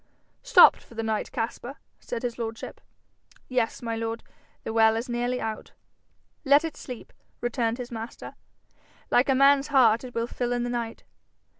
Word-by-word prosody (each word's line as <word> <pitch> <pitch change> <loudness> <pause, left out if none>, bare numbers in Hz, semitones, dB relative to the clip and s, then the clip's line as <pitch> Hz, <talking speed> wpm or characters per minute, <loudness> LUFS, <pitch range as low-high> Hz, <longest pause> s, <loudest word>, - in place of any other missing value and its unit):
'Stopped - - +7
for 235 - -17
the 225 - -3
night, 220 -1 -2
Caspar?' 240 +2 -4 0.2
said 240 -1 -6
his 240 -1 -3
lordship. 225 -1 -6 0.7
'Yes, 250 -2 -1
my 230 -1 -2
lord; 225 0 -4 0.4
the 220 - -4
well 220 -1 +5
is 230 +2 -3
nearly 245 +1 -1
out.' 220 -1 -5 0.7
'Let 285 +2 +5
it 320 - -5
sleep,' 250 -3 -9 0.3
returned 240 -1 -1
his 245 -1 -7
master; 225 0 -7 0.8
'like 250 +4 +4
a 270 - +4
man's 275 +1 +5
heart 245 -5 +4
it 250 -1 -9
will 230 0 0
fill 245 0 -3
in 245 0 -1
the 245 - -3
night. 235 -2 -4
240 Hz, 165 wpm, -26 LUFS, 225-250 Hz, 0.8 s, Stopped